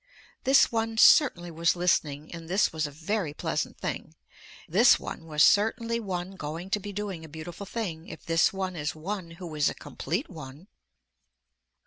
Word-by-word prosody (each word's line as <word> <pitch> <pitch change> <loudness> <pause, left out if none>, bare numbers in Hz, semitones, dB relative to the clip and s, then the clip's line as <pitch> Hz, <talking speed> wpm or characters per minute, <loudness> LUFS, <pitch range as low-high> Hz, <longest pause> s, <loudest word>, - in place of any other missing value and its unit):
This 270 +1 +5
one 225 -1 -1
certainly 175 - +5
was 165 +2 +1
listening 155 -4 0
and 165 -1 -9
this 190 0 +2
was 155 -1 -1
a - - -9
very 160 +1 -3
pleasant - - -2
thing, - - -5 0.5
this - - +5
one 165 - -7
was 150 -1 +3
certainly 230 +2 +3
one 185 -4 -4
going 165 +5 -6
to 210 - +2
be 205 +1 -7
doing 195 -4 -5
a 160 - -10
beautiful 165 +5 -8
thing 180 -8 -4
if - - -10
this 165 +1 +3
one 190 -1 -3
is 150 -1 -3
one 180 +2 -5
who 175 -3 -8
is 150 -1 +2
a - - -6
complete 190 - -4
one. 155 +2 -11
175 Hz, 170 wpm, -27 LUFS, 160-205 Hz, 0.5 s, This